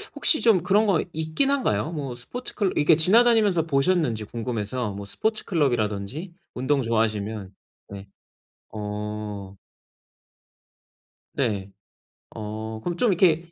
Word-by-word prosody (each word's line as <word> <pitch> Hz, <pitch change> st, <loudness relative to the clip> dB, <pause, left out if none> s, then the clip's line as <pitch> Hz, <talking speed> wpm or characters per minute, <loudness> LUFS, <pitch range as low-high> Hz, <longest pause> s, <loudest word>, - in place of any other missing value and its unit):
혹시 310 Hz, -, +3 dB
좀 210 Hz, -7 st, +4 dB
그런 205 Hz, +4 st, +3 dB
거 185 Hz, -5 st, +3 dB
있긴 160 Hz, -, 0 dB
한가요? 265 Hz, -, 0 dB
뭐 140 Hz, -6 st, -4 dB
스포츠 245 Hz, -, -7 dB
클럽 200 Hz, -4 st, 0 dB
이렇게 150 Hz, +2 st, +5 dB
지나다니면서 210 Hz, +1 st, +4 dB
보셨는지 140 Hz, -6 st, +1 dB
궁금해서. 115 Hz, -1 st, -3 dB
뭐 100 Hz, 0 st, -7 dB
스포츠 215 Hz, -, -2 dB
클럽이라든지 125 Hz, -, -1 dB, 0.2 s
운동 135 Hz, +2 st, +1 dB
좋아하시면. 110 Hz, -3 st, -1 dB, 0.4 s
네. 100 Hz, 0 st, -9 dB, 0.7 s
어. 105 Hz, -2 st, -5 dB, 1.8 s
네. 100 Hz, -7 st, -1 dB, 0.6 s
어 110 Hz, +1 st, -5 dB
그럼 175 Hz, -1 st, -3 dB
좀 240 Hz, -, +3 dB
이렇게 170 Hz, -2 st, +2 dB
130 Hz, 270 characters per minute, -25 LUFS, 105-175 Hz, 1.8 s, 이렇게